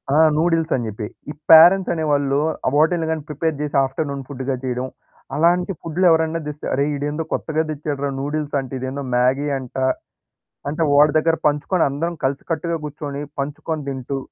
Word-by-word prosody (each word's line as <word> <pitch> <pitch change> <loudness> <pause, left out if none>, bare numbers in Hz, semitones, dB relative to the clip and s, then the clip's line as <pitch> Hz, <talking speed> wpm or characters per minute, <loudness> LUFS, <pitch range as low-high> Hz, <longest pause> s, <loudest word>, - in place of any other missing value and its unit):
ఆ! - - +4 0.2
నూడిల్స్ 165 0 +1
అని 120 -3 -2
జెప్పి. 105 0 -5 0.2
ఈ - - -7 0.2
పేరెంట్స్ 175 +4 +8
అనేవాళ్ళు, 145 -3 +1 0.3
ఆహ్, 130 - +1
వాటిల్ని 160 +2 +3
గాని 160 -2 -2
ప్రిపేర్ 150 +1 -1
జేసి 145 -2 -1
ఆఫ్టర్‌నూన్ 140 0 -4
ఫుడ్డుగా 135 -1 -3
చేయడం. 125 0 -2 0.5
అలాంటి 175 +4 +2
ఫుడ్లు 170 +3 -1
ఎవరన్నా 160 0 +2
దెస్తే, 150 0 -7
అరె 140 +1 +2
ఈడేందో 145 +3 -2
కొత్తగా 160 0 -1
దెచ్చాడురా 145 -1 -3
నూడిల్స్ 145 0 -3
అంట. 130 -1 -7
ఇదేందో 130 +2 -4
మ్యాగీ 130 +4 +2
అంట. 130 0 -8 0.9
అంటే 160 +3 -1
వాడి 145 +1 +6
దగ్గర 165 +1 +2
పంచుకొని 150 +4 +1
అందరం 165 +5 -2
కలిసికట్టుగా 160 +5 -1
గూర్చొని 145 -1 -5 0.2
పంచుకొని 150 +2 -3
దింటూ 135 0 -4
150 Hz, 155 wpm, -21 LUFS, 140-160 Hz, 0.9 s, పేరెంట్స్